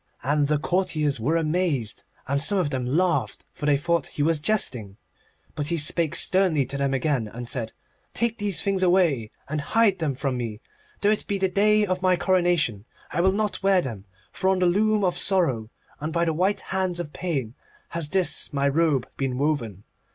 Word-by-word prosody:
And 145 +2 +1
the 150 +1 +2
courtiers 150 -2 0
were 150 +9 +1
amazed, 155 - -1 0.2
and 140 +1 0
some 200 +6 +3
of 170 -6 0
them 130 -3 -2
laughed, 150 - 0
for 150 - -4
they 145 -1 +4
thought 170 +1 0
that - - -9
he 145 - -1
was 160 0 +2
jesting. 125 - -1 0.6
But 145 -1 -3
he 170 +1 0
spake 160 +1 0
sternly 185 -7 +2
to 140 +3 -5
them 140 -1 +1
again, 135 -4 0
and 120 +3 -8
said: 115 -2 -2 0.4
'Take 235 -1 0
these 205 -3 -1
things 195 -1 0
away, 175 - +2 0.2
and 150 +1 -2
hide 205 +5 +2
them 150 -5 -1
from 135 -1 -2
me. 115 -3 -4 0.4
Though 205 - +4
it 215 - -1
be 200 - -1
the 190 -1 +1
day 210 +3 +3
of 185 -1 -2
my 185 -1 +3
coronation, 175 - +1 0.3
I 170 - 0
will 190 +2 +4
not 210 +1 -1
wear 195 -1 +4
them. 105 -6 -6 0.3
For 190 - 0
on 190 - +2
the 185 - +2
loom 210 +4 +2
of 180 -2 +1
Sorrow, 135 - +1 0.3
and 155 +2 -3
by 170 +1 +1
the 165 - 0
white 190 +5 0
hands 185 -2 -2
of 150 -4 -5
Pain, 140 -11 -3 0.4
has 165 -3 -3
this 185 0 +1
my 140 -1 +1
robe 145 -3 +1
been 130 -2 -2
woven. 125 - -1
160 Hz, 200 wpm, -25 LUFS, 135-185 Hz, 0.6 s, they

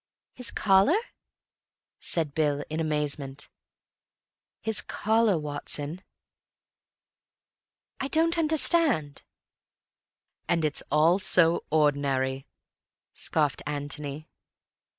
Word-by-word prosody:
"His 250 -2 -6
collar?" 195 - +3 1.0
said 160 -4 -1
Bill 145 -2 0
in 155 - -2
amazement. 150 -3 -3 1.1
"His 220 -1 -3
collar, 220 -3 +1
Watson." 150 +2 -4 2.0
"I 270 - -2
don't 330 +3 +2
understand." 310 - +2 1.3
"And 165 -2 +2
it's 150 - 0
all 165 +5 +4
so 170 -4 +3
ordinary," 140 -3 +1 0.7
scoffed 150 -3 0
Antony. 145 +1 -5
155 Hz, 75 wpm, -27 LUFS, 145-200 Hz, 2.0 s, all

